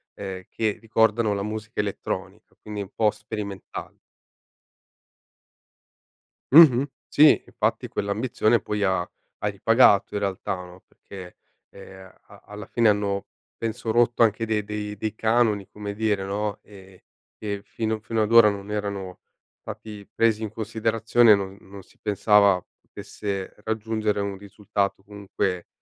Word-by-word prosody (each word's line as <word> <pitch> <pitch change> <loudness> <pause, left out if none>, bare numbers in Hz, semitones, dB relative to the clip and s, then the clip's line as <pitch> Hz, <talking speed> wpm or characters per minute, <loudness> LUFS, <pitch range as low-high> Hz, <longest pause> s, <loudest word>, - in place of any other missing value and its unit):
ehm, 95 -2 -6
che 110 -2 -1
ricordano 110 -1 +2
la 100 0 -2
musica 110 0 -6
elettronica, 100 0 -6
quindi 105 -1 -7
un 100 - -8
po' 110 -2 +3
sperimentale. 105 -2 -7 2.6
Mh-mh. 140 -4 +8 0.2
Sì, 150 0 +5
infatti - - -2
quell'ambizione 110 +2 0
poi 105 -1 -2
ha 95 -2 +2 0.4
ha - - 0
ripagato 105 0 +4
in - - 0
realtà, 100 -2 -2
no, 90 0 -11
perché, 95 -3 -12 0.3
ehm 95 -1 -13 0.2
a - - -16
alla 105 0 -9
fine 115 +1 +2
hanno 100 -1 0 0.3
penso 115 0 -3
rotto 120 +1 +2
anche 115 +1 +1
de 110 -1 -1
dei 105 0 -4
dei - - -25
dei 110 +1 -4
canoni, 110 -3 +1
come 105 0 -6
dire, 105 -2 0
no, 100 +1 -3
ehm, 95 -2 -15 0.4
e 100 -2 -4
fino 110 +1 -3
fino 110 0 -2
ad 105 - -2
ora 115 -2 +8
non 100 0 -6
erano 100 -3 -4 0.4
stati 105 -2 -9
presi 115 -1 +2
in 110 - -3
considerazione 110 +1 +3
non 95 -1 -5
non 95 0 -12
si - - -25
pensava 100 -2 +4 0.2
potesse 100 -2 -6
raggiungere 110 -1 -1
un 100 -1 -3
risultato 100 0 -3
comunque 100 -3 -4
105 Hz, 135 wpm, -24 LUFS, 100-110 Hz, 2.6 s, Mh-mh